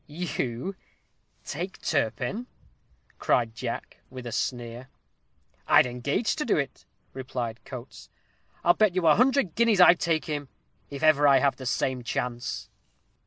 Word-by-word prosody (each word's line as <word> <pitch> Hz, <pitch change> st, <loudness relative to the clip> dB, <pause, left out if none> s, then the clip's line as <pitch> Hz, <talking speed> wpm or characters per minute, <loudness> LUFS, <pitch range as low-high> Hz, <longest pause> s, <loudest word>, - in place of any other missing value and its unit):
"You 150 Hz, -1 st, -3 dB, 0.7 s
take 175 Hz, +6 st, -5 dB
Turpin?" 150 Hz, -, -1 dB, 0.7 s
cried 115 Hz, -2 st, +1 dB
Jack, 105 Hz, -, -5 dB
with 130 Hz, -1 st, -9 dB
a 120 Hz, -, -5 dB
sneer. 120 Hz, +1 st, -4 dB, 0.8 s
"I'd -, -, +6 dB
engage 125 Hz, -, -1 dB
to 300 Hz, -, -1 dB
do 235 Hz, -, +1 dB
it," 140 Hz, -2 st, -4 dB, 0.3 s
replied 125 Hz, -3 st, -5 dB
Coates. 130 Hz, -1 st, -10 dB, 0.5 s
"I'll 175 Hz, -, +6 dB
bet 210 Hz, -3 st, +2 dB
you 185 Hz, -2 st, +1 dB
a 155 Hz, -, +7 dB
hundred 250 Hz, -, +2 dB
guineas 230 Hz, -4 st, +3 dB
I 180 Hz, -1 st, +9 dB
take 165 Hz, -3 st, -1 dB
him, 145 Hz, -3 st, -4 dB, 0.4 s
if 140 Hz, +1 st, -7 dB
I -, -, +5 dB
ever 145 Hz, -3 st, +5 dB
have 140 Hz, 0 st, +1 dB
the 130 Hz, -, -6 dB
same 130 Hz, 0 st, -1 dB
chance." 120 Hz, 0 st, -3 dB
140 Hz, 140 wpm, -27 LUFS, 125-175 Hz, 0.8 s, I